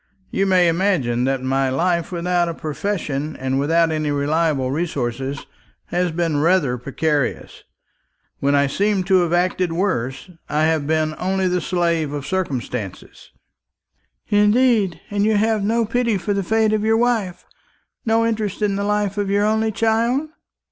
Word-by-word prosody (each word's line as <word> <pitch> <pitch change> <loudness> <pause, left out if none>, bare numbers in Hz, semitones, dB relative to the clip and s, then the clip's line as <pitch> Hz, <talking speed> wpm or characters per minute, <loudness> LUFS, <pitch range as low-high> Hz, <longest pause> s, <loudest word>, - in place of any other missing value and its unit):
You 195 - +1
may 185 -2 +4
imagine 165 -9 +1
that 135 -1 -1
my 135 0 +1
life, 170 +6 0
without 175 0 0
a 165 - -4
profession 155 -3 -3
and 130 +1 -1
without 165 +3 +2
any 155 -1 -1
reliable 145 -2 0
resources, 135 -3 -3 0.4
has 180 0 0
been 165 -2 -1
rather 160 -6 +2
precarious. 145 +2 -2 0.8
When 140 +1 +2
I 140 0 +4
seemed 195 +6 0
to 190 0 +4
have 170 -2 -1
acted 180 0 +1
worst, 165 - -2 0.2
I 150 +1 +1
have 160 -2 +1
been 155 0 +1
only 190 0 0
the 180 0 0
slave 170 -4 0
of 145 -2 -4
circumstances." 125 - -4 1.0
"Indeed! 210 -3 +3
and 205 0 0
have 220 0 +2
you 200 - -1
no 230 +1 +1
pity 235 -1 0
for 190 +3 -2
the 200 - 0
fate 220 +3 +1
of 215 -1 0
your 220 +1 +3
wife, 225 -7 0 0.6
no 225 0 +2
interest 215 -2 -2
in 200 -1 +1
the 200 - -1
life 205 -1 0
of 200 -1 -1
your 205 +1 +2
only 220 +1 +1
child?" 230 +7 +1
175 Hz, 155 wpm, -21 LUFS, 150-205 Hz, 1.0 s, may